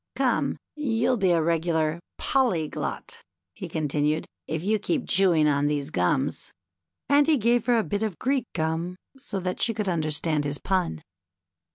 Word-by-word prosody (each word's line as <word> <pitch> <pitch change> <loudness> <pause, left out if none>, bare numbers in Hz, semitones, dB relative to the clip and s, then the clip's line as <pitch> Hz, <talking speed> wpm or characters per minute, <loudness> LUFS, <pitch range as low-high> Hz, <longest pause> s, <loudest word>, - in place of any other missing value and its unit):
Come, - - +1 0.2
you'll 250 -4 +1
be 195 -3 +2
a 170 -2 +3
regular 165 -1 +1 0.2
Polly 230 - +2
glot," - - -4 0.3
he 180 - -7
continued, 150 -1 0
" - - -61
if 160 +1 -3
you 215 +2 +1
keep 285 - 0
on - - -12
chewing 155 -6 +3
these 145 0 -2
gums." 90 - 0 0.6
And 285 +1 +4
he 315 -2 +4
gave 235 +1 +2
her 240 -1 +4
a 225 - +2
bit 205 0 -2
of 215 -6 -2
Greek 260 -2 0
gum 160 +2 -1 0.2
so 230 -8 -4
that 180 0 -3
she 230 -2 +2
could 210 -2 -2
understand 155 -2 0
his 145 0 -1
pun. 180 - -1
175 Hz, 170 wpm, -26 LUFS, 155-225 Hz, 0.6 s, And